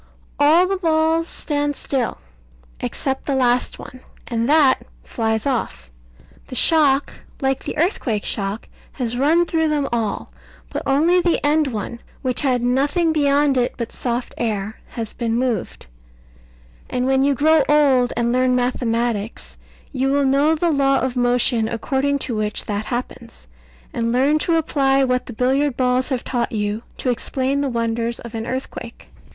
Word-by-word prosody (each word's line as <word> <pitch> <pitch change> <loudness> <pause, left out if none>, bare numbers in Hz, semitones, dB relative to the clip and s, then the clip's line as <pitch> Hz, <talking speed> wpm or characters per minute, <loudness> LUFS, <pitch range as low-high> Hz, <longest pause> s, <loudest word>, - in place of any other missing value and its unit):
All 310 +5 +5
the 390 +1 -1
balls 325 -1 +1
stand 290 -2 -1
still, 260 -4 -2 0.6
except 270 -1 -3
the 280 - +1
last 250 -1 +1
one, 255 - -11 0.3
and 230 +1 -1
that 290 -4 +5 0.2
flies 220 -1 -2
off. 230 - -3 0.6
The - - -8
shock, 290 -4 +3 0.3
like 270 -1 -1
the - - -5
earthquake 290 - 0
shock, 200 +1 -3 0.3
has 245 -3 -2
run 310 +7 +3
through 320 -1 0
them 295 -2 0
all; 225 -4 -2 0.4
but - - -3
only 325 +6 +3
the 345 -1 +1
end 300 0 +3
one, 235 -1 -5 0.2
which 255 -2 0
had 255 -4 +1
nothing 290 +7 +1
beyond 285 -2 +2
it 245 -1 0
but 235 -2 -4
soft 245 0 -3
air, 215 -2 -2
has 225 -2 -6
been 230 -2 -2
moved; 240 -5 -2 1.0
and 250 0 -1
when 265 0 +2
you 280 0 +2
grow 315 +4 +4
old, 275 -5 +4
and 235 0 +1
learn 255 0 +2
mathematics, 235 -3 -1 0.4
you 265 -1 -1
will 280 0 +2
know 280 +4 +3
the 335 +2 +1
law 275 -2 +3
of 260 -1 -1
motion 245 -2 +2
according 270 +5 0
to 250 -4 -3
which 215 0 -2
that 205 0 -3
happens, 240 -1 -6 0.5
and 230 -3 -1
learn 275 +5 +3
to 335 +2 +1
apply 275 -4 +2
what 250 -1 0
the 245 - -7
billiard 265 +3 +1
balls 255 +1 +1
have 260 -3 -2
taught 240 -2 -2
you, 210 0 -2 0.2
to 255 - 0
explain 265 +3 -1
the 280 - 0
wonders 230 0 -2
of 235 - -9
an 225 0 -4
earthquake. 255 -2 -6
260 Hz, 160 wpm, -21 LUFS, 235-290 Hz, 1.0 s, All